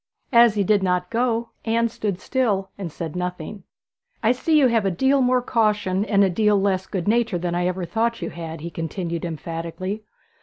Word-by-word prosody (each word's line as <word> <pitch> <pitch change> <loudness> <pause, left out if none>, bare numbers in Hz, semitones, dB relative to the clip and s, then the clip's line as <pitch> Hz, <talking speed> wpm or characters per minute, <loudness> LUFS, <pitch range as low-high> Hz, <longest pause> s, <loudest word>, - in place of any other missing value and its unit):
As 235 -2 +6
he 205 - +2
did 205 +1 +3
not 180 -1 0
go 235 0 0
Anne 230 +1 +1
stood 210 -4 -3
still 200 -8 0
and 185 -5 -6
said 165 +1 -6
nothing. 180 +2 -5 0.6
'I 225 - +5
see 310 +5 +2
you 290 - +5
have 230 -3 +3
a 195 - +2
deal 265 +10 +2
more 250 0 +2
caution 210 -5 +1
and 200 -2 +3
a 195 - +3
deal 210 +1 +3
less 190 -1 0
good 185 -2 -3
nature 230 -3 +2
than 175 0 -2
I 175 +1 0
ever 180 0 -2
thought 230 +6 -1
you 170 - -4
had,' 165 -2 -7
he 170 +2 -6
continued 165 +1 -4
emphatically. 170 +5 -5
195 Hz, 195 wpm, -23 LUFS, 175-230 Hz, 0.6 s, As